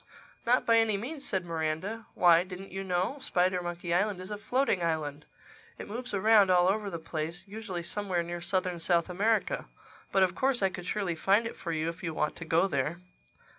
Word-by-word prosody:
"Not 250 +2 +4
by 230 0 +5
any 220 -2 +2
means," 275 +7 -6
said 190 -2 -1
Miranda. 165 +7 -3
"Why, 175 -1 +6
didn't 185 +1 -9
you 195 +1 -4
know?—Spidermonkey 180 -3 -1
Island 200 +1 +1
is 185 +3 -8
a 210 - -3
floating 250 -4 +1
island. 155 -3 -2 0.5
It - - -8
moves 245 +4 -5
around 205 0 +5
all 180 -1 +5
over 205 +1 0
the 170 - -4
place—usually 175 +5 -5
somewhere 185 -2 -2
near 175 0 -5
southern 180 0 0
South 170 +1 +2
America. 220 - +1 0.5
But 195 - +4
of 185 -1 +2
course 260 +2 +1
I 195 - +4
could 180 -1 -8
surely 200 -5 -1
find 195 +7 +2
it 230 - -5
for 170 - -5
you 160 0 -1
if 165 +3 -5
you 165 -4 -4
want 150 - 0
to 165 - -7
go 165 +3 +3
there." 150 -1 -1
185 Hz, 190 wpm, -30 LUFS, 170-210 Hz, 0.5 s, Why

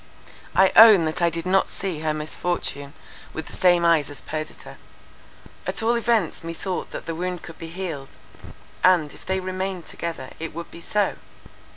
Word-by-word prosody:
I 190 0 +6
own 215 -6 +9
that 155 +2 -2
I 170 - +4
did 165 +1 -4
not 190 +1 +3
see 185 -6 -4
her 155 0 0
misfortune 150 -2 -3 0.4
with 160 - -5
the - - -12
same 175 -2 +4
eyes 165 -4 +4
as 145 - -9
Perdita. 155 0 -6 0.9
At - - -1
all 230 +1 +3
events 230 -9 +1
methought 165 +3 -4
that - - -7
the 165 - -3
wound 180 +1 -3
could 160 - -10
be 165 - -6
healed; 165 -6 -6 0.7
and, 175 -5 +4
if - - -15
they 190 0 +1
remained 185 -1 -3
together, 165 -6 -6
it 165 -1 -6
would 170 0 -7
be 170 - -11
so. 205 +2 0
170 Hz, 175 wpm, -24 LUFS, 160-190 Hz, 0.9 s, own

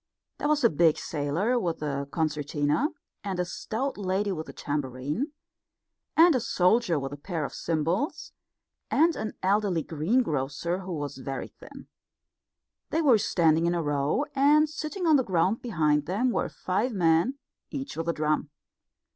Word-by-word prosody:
There - - 0
was 300 -2 +2
a 235 - +7
big 160 0 +4
sailor 165 - -1
with 170 -7 -2
a 140 -1 -2
concertina, 150 - 0 0.4
and 195 -3 -3
a 180 - +1
stout 225 +8 -4
lady 195 +1 0
with 160 -4 -5
a - - -5
tambourine, 145 - -3 0.9
and 335 +1 +7
a 255 - +2
soldier 215 -3 +2
with 135 0 -4
a - - -6
pair 160 0 -3
of - - -7
cymbals, 170 - -1 0.6
and 320 +3 +3
an 215 - -4
elderly 195 -4 +2
greengrocer, 160 - 0
who 185 -1 -6
was 145 -4 -5
very 135 +1 -5
thin. - - -13 1.0
They 325 +1 0
were 250 -7 +5
standing 165 -3 +2
in 175 - +1
a 170 - -1
row, 145 - 0
and 295 +3 +5
sitting 315 +4 -4
on 315 -3 +6
the 260 - +2
ground 190 +2 +1
behind 150 -10 +1
them 225 +8 +1
were - - -1
five 210 +7 -1
men, 175 +7 +2 0.3
each 275 -1 -5
with 165 +1 -3
a - - +2
drum. 155 -1 0
180 Hz, 160 wpm, -27 LUFS, 150-245 Hz, 1.0 s, a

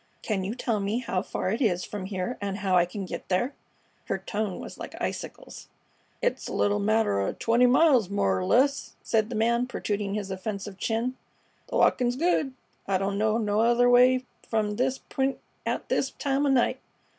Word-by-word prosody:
Can 200 -4 -1
you 205 +5 -3
tell 230 -4 -1
me 200 +3 -1
how 210 -7 -1
far 185 - -3
it 225 - -2
is 180 -7 +2
from 200 -3 -6
here 195 +5 -3
and 200 -1 -2
how 190 -2 +1
I 175 -1 +5
can 195 +2 -5
get - - -7
there?" 220 +9 +1 0.5
Her 195 - -1
tone 200 0 -3
was - - -9
like - - -8
icicles. - - -6 0.6
"It's - - 0
a - - -5
little 205 0 +2
matter 215 - +2
o' 100 - -1
twenty 235 +2 +3
miles, 255 - +4
more 100 - +1
'r - - -2
less," 275 - +2
said 220 -1 +1
the 235 - -4
man 235 +3 +2
protruding 205 -4 -2
his 200 -2 -3
offensive 195 0 -5
chin. 235 +3 -1 0.5
"The - - -2
walkin's 245 -1 +3
good. 290 -3 +1 0.3
I 195 -1 +2
don't 195 +1 -1
know 215 +1 +2
no 210 -2 0
other 240 +2 +4
way 255 +1 +5 0.2
from 210 -2 0
this 260 +1 +1
p'int 270 0 -2 0.3
at - - -2
this 270 - +1
time 280 0 0
o' - - +2
night. 260 -3 +2
220 Hz, 190 wpm, -27 LUFS, 195-250 Hz, 0.6 s, I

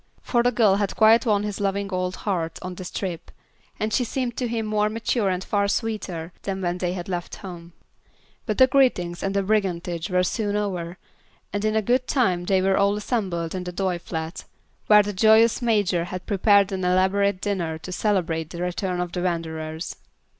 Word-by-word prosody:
For 240 - +2
the 245 +1 +2
girl 215 -5 +4
had 200 -1 -1
quite 225 +3 +5
won 205 -2 +2
his 210 -1 -4
loving 200 0 -1
old 185 0 -1
heart 165 -5 -2
on 180 0 -5
this 180 0 -7
trip, 180 -4 -5 0.5
and 215 0 -1
she 250 - +2
seemed 245 0 -3
to 250 - -1
him 230 -1 -2
more 210 0 +1
mature 225 -1 0
and 185 0 -1
far 200 0 +1
sweeter 200 -6 -3
than 195 -1 -3
when 180 -1 -2
they 180 -1 -1
had 175 -2 -5
left 175 -2 -4
home. 170 -2 -9 0.7
But 215 - -1
the 260 - +8
greetings 250 -10 +2
and 195 0 -2
the 200 - +2
"brigandage" 180 -4 -1
were 180 0 +2
soon 205 +2 -1
over, 180 -4 -3 0.6
and 205 0 -2
in 215 0 +2
good 250 +1 +2
time 185 -10 +1
they 190 0 +2
were 190 0 +3
all 200 +1 +3
assembled 190 -7 -2
in 185 -1 -3
the 180 - -5
Doyle 180 -1 -1
flat, 160 -1 -5 0.4
where 210 -1 +7
the 205 0 -4
joyous 220 +4 +5
Major 205 -7 +1
had 180 +1 -6
prepared 200 -1 +3
an 190 -1 -3
elaborate 190 +2 +2
dinner 180 -6 -2
to 170 +3 -9
celebrate 175 -5 0
the 170 - -8
return 180 0 -2
of 175 -1 -3
the 180 - -3
wanderers. 160 -2 -3
195 Hz, 195 wpm, -24 LUFS, 180-210 Hz, 0.7 s, the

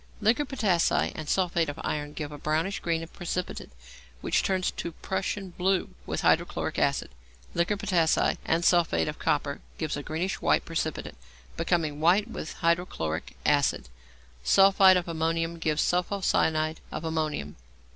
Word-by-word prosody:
Liquor 225 +7 +2
potassæ 205 -11 +1
and 155 -1 -6
sulphate 175 -4 +1
of 145 - -6
iron 145 0 -3
give 150 -1 -5
a 145 - -7
brownish 160 +7 -1
green 165 -1 -2
precipitate, 175 +1 -4 0.5
which - - +1
turns 185 -2 0
to 170 - -5
Prussian 190 +1 -3
blue 185 +1 0 0.2
with - - -2
hydrochloric - - +1
acid. - - 0 0.4
Liquor 175 +5 +1
potassæ 180 -6 +2
and 165 +1 +1
sulphate 165 - +3
of - - -5
copper - - 0 0.2
give 155 - -2
a 145 - -4
greenish 165 +6 -3
white - - +2
precipitate, - - -3 0.4
becoming 165 -3 0
white 180 +7 +4
with 195 -8 -6
hydrochloric 170 - -1
acid. - - +2 0.5
Sulphide 195 - +6
of 180 - -2
ammonium 165 0 -1
gives 155 -1 +1
sulpho 180 +3 0
cyanide 155 -3 +1
of - - -5
ammonium. 155 - -2
170 Hz, 145 wpm, -27 LUFS, 155-185 Hz, 0.5 s, Sulphide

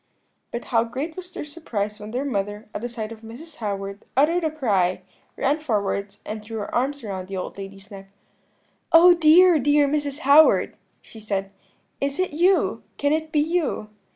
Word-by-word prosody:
"But 235 - -6
how 230 -1 +4
great 270 +8 -5
was 365 -1 -9
their - - -6
surprise 220 -10 -4
when 210 0 -8
their 255 +5 -3
mother, 205 -4 -3
at - - -4
the 240 - -4
sight 225 -2 -6
of 225 -1 -10
Mrs. 245 +9 -11
Howard, 200 -2 -4
uttered 330 +5 +3
a 315 - +1
cry, 195 - 0 0.3
ran 285 +3 +1
forwards 205 -6 -2
and 215 0 -5
threw 220 +1 -7
her 205 - -5
arms 275 +3 -1
round 190 -3 -5
the 195 0 -5
old 185 - -5
lady's 195 +1 -10
neck. 195 -1 -11 0.8
"'Oh, 350 +2 +8
dear, 335 +1 +6
dear 290 +1 +3
Mrs. 290 0 -2
Howard,' 290 +3 +5 0.3
she 225 - -13
said, 195 -2 -3 0.5
'is 280 0 -1
it 370 0 0
you? 360 +5 +2 0.2
Can 285 +1 +1
it 315 0 -2
be 300 - +3
you?' 315 -9 -1
245 Hz, 180 wpm, -23 LUFS, 205-310 Hz, 0.8 s, Oh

